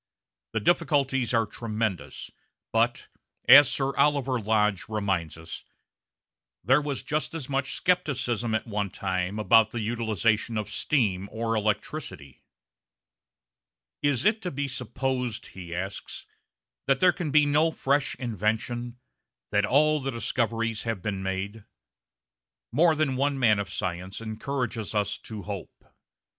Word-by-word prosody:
The 110 - +1
difficulties 135 -3 +2
are 115 -2 +3
tremendous, 110 -2 -4 0.4
but, - - +1 0.4
as 145 -1 +10
Sir 135 -1 -1
Oliver 140 -3 +2
Lodge 105 -2 +1
reminds 95 -7 -1
us, 80 +1 -8 1.0
there 135 - +4
was 145 -2 -3
just 155 +2 -2
as 150 -6 -5
much 135 -1 -1
scepticism 120 - +1
at 110 - -1
one 105 -3 -2
time 95 +1 -2
about 110 +1 +5
the 115 - -4
utilisation 110 0 0
of 105 0 -3
steam 105 - 0
or 115 0 -2
electricity. 105 - -3 1.6
"Is 145 +1 +1
it 215 +1 +3
to 180 - -3
be 140 -2 -3
supposed," 125 -2 -3
he 85 -2 -7
asks, 95 +2 -5 0.6
"that 135 -1 +3
there 180 -1 +5
can 175 -5 -3
be 150 +1 +5
no 150 +3 +3
fresh 140 -2 0
invention, 120 +1 -2 0.5
that 105 0 +2
all 155 +3 +4
the 135 - -2
discoveries 115 -1 -1
have 115 -5 -3
been 100 -3 -2
made?" 95 +3 -4 1.1
More 165 +1 +4
than 145 -4 0
one 140 +1 +1
man 110 -5 +4
of 100 - -3
science 95 0 -4
encourages 115 0 -3
us 100 -1 0
to 110 -3 -8
hope. 100 -2 -7
115 Hz, 130 wpm, -27 LUFS, 105-135 Hz, 1.6 s, as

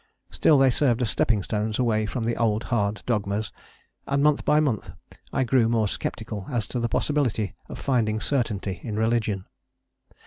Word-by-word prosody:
Still 150 - +4
they 135 -1 +5
served 125 -2 +2
as 115 - 0
stepping 105 -5 +1
stones 105 +1 -2
away 110 -4 +1
from 120 +2 -3
the 115 +1 0
old 110 -1 +1
hard 105 -2 0
dogmas, 105 -2 -1 0.6
and 140 0 +1
month 150 -1 +3
by 150 +1 +4
month 135 -9 -1 0.4
I 135 - +1
grew 120 -2 +3
more 115 -2 +2
sceptical 105 -1 -4
as 120 -5 -1
to 125 - -2
the 120 0 -1
possibility 120 -7 0 0.2
of - - -7
finding 110 -5 0
certainty 105 -8 -1
in 110 -3 -5
religion. 110 -3 0
115 Hz, 170 wpm, -25 LUFS, 105-125 Hz, 0.6 s, they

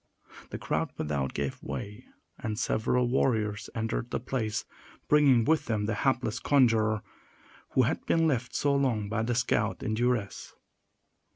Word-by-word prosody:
The - - -5
crowd - - -2
without 70 -3 -2
gave 70 -1 -3
way, 105 +5 -6 0.3
and 110 -1 -3
several 120 +2 +1
warriors 110 -4 0
entered 115 +1 -2
the - - -2
place, 115 -3 -2 0.4
bringing 140 -6 +5
with 160 0 +2
them 110 -3 0
the 110 - -1
hapless 120 -1 0
conjurer, 115 -7 +3 0.7
who - - +4
had - - -1
been 165 -1 +3
left 130 -6 0
so 145 -1 +2
long 120 -7 0
by 110 +1 -1
the 120 +2 0
scout 110 -3 0
in 110 - -1
duress. 120 -3 -1
115 Hz, 150 wpm, -29 LUFS, 105-125 Hz, 0.7 s, bringing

